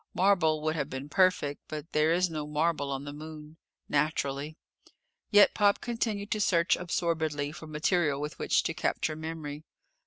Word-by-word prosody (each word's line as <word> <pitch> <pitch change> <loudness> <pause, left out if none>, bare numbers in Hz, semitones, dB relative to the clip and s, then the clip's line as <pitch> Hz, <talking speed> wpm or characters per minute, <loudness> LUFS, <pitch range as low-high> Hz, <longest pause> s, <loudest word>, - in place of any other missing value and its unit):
Marble 175 -5 +3
would 155 0 0
have 150 -2 -2
been 135 +1 -6
perfect, 180 -5 +2
but 155 +2 -7
there 155 +1 +3
is 180 +2 +3
no 155 -3 -5
marble 150 -1 0
on 135 0 -3
the 145 - -6
Moon. 155 +1 -10 0.3
Naturally! 150 0 -1 0.7
Yet 205 0 +6
Pop 205 -1 +3
continued 220 -4 -3
to 215 - 0
search 170 -3 +3
absorbedly 160 -4 -1
for 155 +1 -10
material 155 -1 +1
with 150 +1 -5
which - - +2
to 165 - -1
capture 165 -2 -1
memory. 155 -2 -6
155 Hz, 160 wpm, -29 LUFS, 150-175 Hz, 0.7 s, Yet